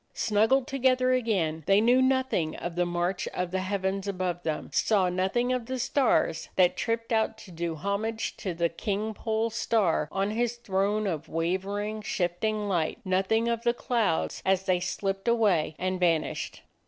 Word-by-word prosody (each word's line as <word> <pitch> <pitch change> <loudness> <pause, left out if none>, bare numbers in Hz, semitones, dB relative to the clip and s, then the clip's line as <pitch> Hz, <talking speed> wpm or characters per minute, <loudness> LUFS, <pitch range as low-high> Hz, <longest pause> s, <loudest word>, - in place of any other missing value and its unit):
Snug 215 0 +2
gled 270 -1 +3
together 255 -2 +2
again, 190 -11 0
they 195 +1 +5
knew 245 +4 +4
nothing 260 -11 +1
of 175 -1 -5
the 175 0 +1
march 175 +2 -1
of 180 -1 -2
the 190 - 0
heavens 190 +1 -2
above 185 -2 -2
them, 155 -3 -3
saw 195 -4 +3
nothing 190 +8 0
of 245 -2 -3
the 260 0 -3
stars 245 - +1
that 180 -2 +4
tripped 230 0 -2
out 220 0 +1
to 200 - -13
do 170 -1 -3
homage 205 +7 -2
to 185 -4 -4
the 170 0 +2
King 205 +6 -3
Pole 220 +1 -1
Star 185 -10 +1
on 195 +1 0
his 240 +2 0
throne 210 -1 0
of 165 -5 -3
wavering, 195 +6 -2
shifting 205 +3 -1
light, 170 -5 0
nothing 195 +5 +1
of 235 -1 0
the 235 0 +1
clouds, 220 -10 0
as 190 0 +2
they 185 -2 +2
slipped 195 +3 -3
away 200 -10 +2
and 185 0 -2
vanished. 165 -3 0
200 Hz, 170 wpm, -28 LUFS, 180-225 Hz, -, they